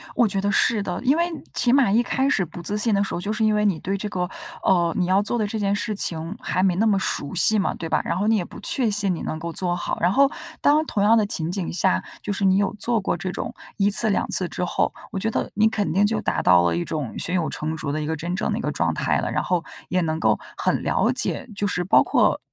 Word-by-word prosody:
我 240 - +4
觉 195 -1 -2
得 200 +1 0
是 210 0 +2
的， 180 -2 -4
因 275 +5 +3
为 340 - +2 0.3
起 245 0 +3
码 270 -7 +4
一 230 +4 +3
开 265 +2 0
始 190 - +1
不 175 +1 -10
自 205 +5 -3
信 215 +1 +1
的 200 - +2
时 195 - -5
候， - - -2
就 205 +3 -2
是 220 0 -1
因 215 -1 +3
为 210 - +1
你 190 -6 +1
对 195 +2 -2
这 205 - -4
个， 180 -2 -2 0.3
呃， 170 -3 +2
你 180 - +1
要 190 +2 +3
做 225 +3 -1
的 215 - 0
这 220 - -4
件 200 -1 +1
事 210 +1 -3
情 165 0 -3
还 185 - -1
没 185 -2 +2
那 215 +5 +1
么 205 -3 +3
熟 145 -4 -3
悉 200 +4 +4
嘛， 195 - 0
对 165 - -6
吧？ 155 - +1
然 - - -1
后 205 - 0
你 225 - +4
也 180 - -1
不 - - -11
确 250 -5 +1
信 200 -2 +1
你 - - -7
能 155 - -4
够 170 +1 -5
做 175 +1 -2
好。 - - -3
然 175 +2 +3
后 275 +6 +4 0.3
当 305 +2 +3
同 205 -7 -1
样 225 +2 +5
的 215 - +3
情 165 -4 -2
景 185 -2 -3
下， 90 - +2 0.2
就 205 - -4
是 195 0 -1
你 190 0 +4
有 200 0 +1
做 235 0 0
过 - - -1
这 185 - -4
种 - - -5 0.2
1 200 -1 +3
次 215 +2 +6
2 200 - 0
次 185 - 0
之 180 - -4
后， 175 - 0 0.2
我 195 - -3
觉 220 +3 0
得 - - -2
你 215 +1 +4
肯 210 -2 -1
定 195 +5 +3
就 215 +1 0
达 - - -1
到 90 -1 +5
了 85 -1 +1
一 85 - -2
种 150 -7 -4
胸 180 - -2
有 170 -3 0
成 155 +1 -4
竹 150 -2 -4
的 155 +1 -2
一 150 - -3
个 160 - -2
真 170 +3 -4
正 - - -1
的 - - -1
一 - - -3
个 - - -2
状 - - 0
态 - - 0
了， - - -2
然 - - -1
后 180 -2 0 0.3
也 180 0 +1
能 160 -1 -1
够 - - +2 0.2
很 - - 0
了 - - +1
解， 255 - -2
就 205 - -1
是 180 -1 -1
包 190 +5 +5
括 - - +2
195 Hz, 310 characters per minute, -23 LUFS, 175-215 Hz, 0.3 s, 次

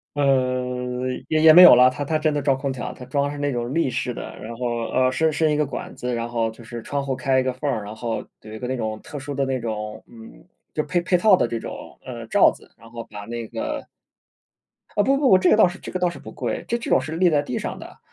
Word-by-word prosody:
呃， 125 -2 0 0.2
也 155 - +1
也 160 -1 +8
没 180 - +10
有 180 - +11
了， 125 +1 +7
它 145 - -4
它 155 +2 0
真 155 -1 +1
的 145 - -1
装 135 -1 +2
空 135 0 -2
调， 125 - -5
它 125 - -11
装 140 +2 0
的 145 - -2
是 145 - -7
那 145 -1 -1
种 120 0 -3
立 165 -5 +2
式 125 - -2
的， - - -8
然 115 +2 -7
后， 125 - -4 0.2
呃， 130 0 +2
伸 160 +3 +1
伸 155 +1 +1
一 - - +2
个 150 0 +1
管 - - -7
子， 125 0 -3
然 115 0 -3
后， 115 -1 -1
就 115 +1 -13
是 120 0 -7
窗 140 +3 -3
户 135 -1 -1
开 130 0 +1
一 - - +1
个 130 -1 -1
缝 140 +3 -3
儿， 110 -6 -2
然 105 +2 -8
后， 115 0 -4 0.2
有 110 - -12
一 - - -6
个 125 - -5
那 130 - -2
种 110 -3 -3
特 145 - -7
殊 140 0 -6
的 135 0 0
那 130 -1 -1
种 105 -2 -5
嗯， 115 -1 -14 0.3
就 155 - 0
配 175 - 0
配 180 +1 +1
套 190 +2 +6
的 - - +1
这 115 -1 -3
种， - - -9
呃， - - -7
罩 - - +5
子， - - -17
然 115 +1 -17
后 115 0 -7
把 105 -2 -10
那 115 0 -5
个 115 0 -4 1.1
啊， 205 - +3
不 275 +3 +3
不 275 -3 +3
不， 185 - +7
这 185 -1 +3
个 - - +7
倒 215 - +7
是 175 +2 -7
这 - - -8
个 185 - -3
倒 180 -1 +2
是 - - -9
不 - - -10
贵。 - - -4
这 235 - 0
种 180 - +2
是 155 +5 -6
立 180 -1 +4
在 145 -2 +2
地 125 - -4
上 - - -5
的， - - -12
130 Hz, 305 characters per minute, -23 LUFS, 120-150 Hz, 1.1 s, 有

